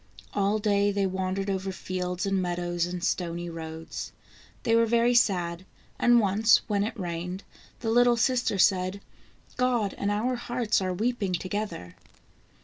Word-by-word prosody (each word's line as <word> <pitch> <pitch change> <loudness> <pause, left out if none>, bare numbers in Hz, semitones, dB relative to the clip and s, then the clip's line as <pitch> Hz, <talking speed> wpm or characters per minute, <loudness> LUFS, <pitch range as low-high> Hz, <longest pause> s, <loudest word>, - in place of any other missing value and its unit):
All 200 +1 +1
day 205 -1 +2
they 200 -1 0
wandered 190 +1 -2
over 190 -1 -2
fields 180 0 -3
and 195 -1 +1
meadows 175 -1 -1
and 175 0 -5
stony 175 -2 -2
roads. 160 0 -7 0.5
They 230 - +3
were 230 0 +4
very 235 +1 +3
sad, 180 -7 +2 0.4
and 240 0 +5
once, 215 +2 +4
when 205 -2 0
it 220 +1 -4
rained, 180 +1 -4 0.4
the 225 -2 -1
little 240 0 +5
sister 240 -3 +1
said: 185 0 +2 0.3
" - - -33
God 245 -5 +1
and 200 - 0
our 235 +5 0
hearts 240 -3 0
are 185 -1 -1
weeping 210 0 -1
together." 185 - -4
195 Hz, 150 wpm, -27 LUFS, 180-225 Hz, 0.5 s, and